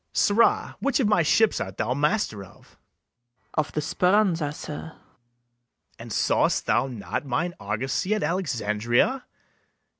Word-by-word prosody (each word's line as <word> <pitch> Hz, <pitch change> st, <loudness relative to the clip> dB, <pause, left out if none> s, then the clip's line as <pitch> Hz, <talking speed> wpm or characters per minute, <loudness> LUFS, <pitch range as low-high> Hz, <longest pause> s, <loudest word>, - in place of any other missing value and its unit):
Sirrah, 215 Hz, +3 st, +2 dB
which 280 Hz, 0 st, 0 dB
of 245 Hz, -, +2 dB
my 205 Hz, -5 st, +3 dB
ships 215 Hz, +7 st, +3 dB
art 95 Hz, 0 st, -5 dB
thou 125 Hz, -, 0 dB
master 145 Hz, -, 0 dB
of? 95 Hz, -, -18 dB
MERCHANT. -, -, -27 dB, 0.8 s
Of 155 Hz, -1 st, -1 dB
the 150 Hz, -, -1 dB
Speranza, 180 Hz, -2 st, +2 dB
sir. 150 Hz, 0 st, -7 dB
BARABAS. -, -, -26 dB, 1.0 s
And -, -, -9 dB
saw'st -, -, +1 dB
thou -, -, +2 dB
not 120 Hz, 0 st, -4 dB
Mine 150 Hz, +6 st, -2 dB
argosy 130 Hz, -, -1 dB
at 215 Hz, -, -2 dB
Alexandria? 130 Hz, -, 0 dB
155 Hz, 140 wpm, -25 LUFS, 120-205 Hz, 1.0 s, my